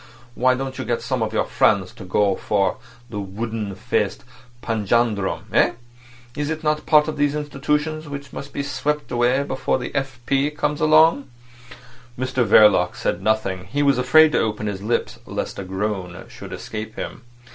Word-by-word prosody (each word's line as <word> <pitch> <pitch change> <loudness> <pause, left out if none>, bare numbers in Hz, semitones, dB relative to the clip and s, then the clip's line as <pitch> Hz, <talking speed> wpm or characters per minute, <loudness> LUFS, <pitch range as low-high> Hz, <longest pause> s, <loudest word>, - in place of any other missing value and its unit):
Why 130 +1 +3
don't 130 0 -5
you - - -2
get 120 - -2
some 130 -3 -1
of 110 -1 -1
your 110 - +1
friends 95 -4 +2
to - - -11
go 100 +1 +2
for 100 -1 0 0.3
that 105 - -4
wooden 105 +1 -4
faced - - -1 0.4
panjandrum—eh? 110 -2 +1 0.6
Is 145 0 -2
it 160 0 -3
not 150 0 0
part 150 -1 +5
of 155 - -4
these 145 0 +1
institutions 150 +1 -2
which 140 -1 -7
must 140 0 -7
be 140 - -3
swept 150 +1 -2
away 125 +3 +2
before 130 -2 -1
the 125 - -6
F. 135 -3 -3
P. 140 +1 +2
comes 150 0 -2
along?" 155 -2 +5 0.9
Mr 130 0 0
Verloc 105 -2 +5
said 85 - -2
nothing. 95 -3 0
He 145 +5 -1
was 140 -3 +3
afraid 155 +5 +6
to - - +2
open 105 -1 -1
his 100 -2 -3
lips 110 +4 -1
lest - - -4
a - - -4
groan 95 -1 -4
should - - -10
escape 110 +1 -6
him. - - -6
125 Hz, 170 wpm, -22 LUFS, 105-145 Hz, 0.9 s, afraid